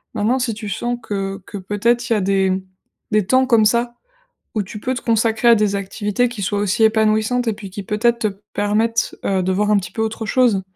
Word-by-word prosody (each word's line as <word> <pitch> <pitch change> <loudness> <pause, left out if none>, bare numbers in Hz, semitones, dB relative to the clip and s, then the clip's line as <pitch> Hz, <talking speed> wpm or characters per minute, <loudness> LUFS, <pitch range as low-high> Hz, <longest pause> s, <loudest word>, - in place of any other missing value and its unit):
Maintenant 230 +5 +1
si 245 -3 -1
tu 215 -1 -7
sens 240 +4 -2
que 195 -1 -4
que, 205 - -7
peut-être, 230 +5 0
il - - +3
y - - +3
a 210 - 0
des 190 0 +1 0.5
des 215 -2 +2
temps 260 0 +4
comme 230 -4 +4
ça, 235 +2 +1 0.6
où 215 - 0
tu 205 +3 -9
peux 255 +4 -2
te 255 - -5
consacrer 225 0 +1
à 235 - +8
des 210 -2 +1
activités 205 +4 -1
qui 235 -3 -7
soient 205 +1 -1
aussi 205 +2 +1
épanouissantes 220 +2 +2
et 225 - +2
puis 205 -1 -9
qui, 200 - -6
peut-être, 230 +4 +1
te 225 - +1 0.3
permettent, 220 +2 0
heu, 190 -1 +1
de 185 - 0
voir 205 +3 +1
un 210 - +5
petit 180 -3 -4
peu 220 - -4
autre 220 0 -3
chose. 235 -5 +3
215 Hz, 230 wpm, -19 LUFS, 200-235 Hz, 0.6 s, à